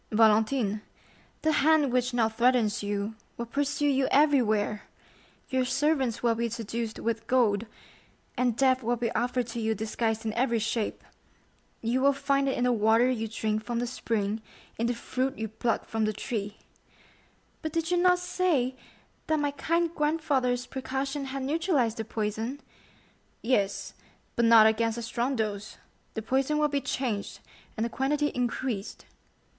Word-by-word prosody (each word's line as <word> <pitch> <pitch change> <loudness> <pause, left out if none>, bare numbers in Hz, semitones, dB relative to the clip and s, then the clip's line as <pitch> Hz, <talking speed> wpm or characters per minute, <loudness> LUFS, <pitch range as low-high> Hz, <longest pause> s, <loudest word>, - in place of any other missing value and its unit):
"Valentine, 220 0 +3 0.6
the 315 - +3
hand 300 -3 +3
which 250 0 +1
now 240 -2 +2
threatens 230 -1 +2
you 205 +1 -2 0.2
will 235 - -3
pursue 285 +4 -1
you 270 -1 +2
everywhere; 235 -8 +3 0.7
your 260 -2 +1
servants 270 -2 0
will 235 -1 +4
be 235 +1 -1
seduced 230 0 -4
with 225 0 -2
gold, 230 -4 +2 0.7
and 245 -2 +1
death 260 -1 +3
will 240 +1 0
be 235 -1 -2
offered 245 +2 0
to 235 +1 -5
you 220 0 0
disguised 220 +1 -2
in 220 - -1
every 235 0 +1
shape. 225 0 -2 0.8
You 240 +3 +1
will 280 +1 +5
find 275 0 +1
it - - -1
in 245 - 0
the 250 - +3
water 225 +2 +4
you 225 -3 -2
drink 215 0 -2
from 240 0 -3
the 240 - 0
spring, 220 -3 -2 0.4
in 230 - +1
the 240 - 0
fruit 260 +3 -2
you 220 - -3
pluck 220 +2 -1
from 220 -1 -1
the 215 - 0
tree." 210 -1 -4 1.0
"But 315 - -3
did 330 +2 -1
you 355 - +3
not 360 0 +5
say 355 -8 0 0.5
that 315 -1 +2
my 290 -1 0
kind 335 +3 0
grandfather's 285 -6 0
precaution 270 +1 -3
had 270 0 -4
neutralized 285 - +1
the 225 - -3
poison?" 220 +4 -3 0.8
"Yes, 205 -5 0 0.4
but 235 - +2
not 230 -1 +8
against 225 +1 +2
a 235 - -4
strong 240 +3 -1
dose; 210 -2 -3 0.4
the 220 - -3
poison 270 +5 +1
will 300 0 +2
be 285 -1 0
changed, 245 -6 -2 0.4
and 220 - 0
the - - 0
quantity 295 +4 +1
increased." 245 -4 -3
245 Hz, 160 wpm, -28 LUFS, 220-275 Hz, 1.0 s, not